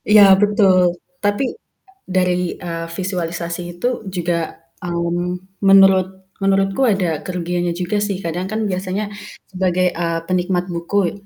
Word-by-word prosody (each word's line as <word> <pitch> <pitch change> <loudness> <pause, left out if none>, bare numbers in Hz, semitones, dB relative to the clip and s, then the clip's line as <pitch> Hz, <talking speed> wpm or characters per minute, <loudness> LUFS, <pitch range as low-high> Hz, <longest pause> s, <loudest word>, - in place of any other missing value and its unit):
Ya 210 - +10 0.2
betul. 190 -4 +4 0.3
Tapi 205 +5 +1 0.6
dari, 180 -1 0
eee, 165 -1 -4
visualisasi 175 -2 -3 0.2
itu 210 - -1 0.3
juga, 175 0 0 0.5
mmm, 175 +2 -3
menurut 195 -1 +7 0.4
menurutku 195 +4 +2
ada 200 -6 +2 0.2
kerugiannya 175 -1 -2
juga 180 +4 -1
sih. 200 -3 -2
Kadang 175 +2 -2
kan 220 - -1
biasanya 185 +2 -2 0.5
sebagai, 185 -1 +1
eee, 170 -1 0
penikmat 180 0 0
buku, 170 +4 -3
e - - -3
180 Hz, 125 wpm, -19 LUFS, 175-195 Hz, 0.6 s, Ya